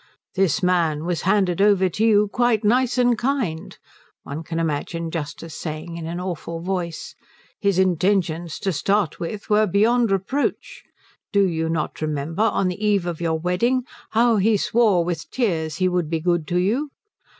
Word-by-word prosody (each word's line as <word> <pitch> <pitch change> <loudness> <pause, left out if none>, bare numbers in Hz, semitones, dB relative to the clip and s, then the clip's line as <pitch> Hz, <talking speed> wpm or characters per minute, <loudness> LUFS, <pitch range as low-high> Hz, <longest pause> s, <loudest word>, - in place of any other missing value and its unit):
"This 195 +1 +1
man 165 -4 +1
was 175 -1 -1
handed 195 -3 +2
over 200 -2 +4
to 195 +5 -2
you 210 -2 +4
quite 240 0 +1
nice 245 +3 +2
and 245 -1 +4
kind," 235 - -2 0.5
one 145 +3 -6
can 165 0 -5
imagine 165 +1 -2
Justice 155 0 -5
saying 155 +1 -6
in 165 -1 -6
an 170 +2 -4
awful 170 -2 -5
voice; 175 -2 -4 0.5
"his 200 -3 +1
intentions 175 -3 +1
to 195 - 0
start 195 +2 0
with 200 +5 -5
were 215 0 +3
beyond 225 +5 +3
reproach. 275 - -2 0.5
Do 200 -1 +3
you 160 -2 -1
not 160 -1 -3
remember, 155 +4 -2
on 210 -3 +2
the 180 +3 -4
eve 205 -4 +2
of 170 -2 -4
your 165 -1 0
wedding, 190 +10 0 0.3
how 230 0 +3
he 210 +2 +3
swore 205 -5 +2
with 170 -2 -4
tears 165 -11 -1
he 185 +2 +1
would 180 -3 0
be 165 0 -1
good 170 -1 0
to 175 - 0
you? 230 +12 0
180 Hz, 170 wpm, -22 LUFS, 165-210 Hz, 0.5 s, over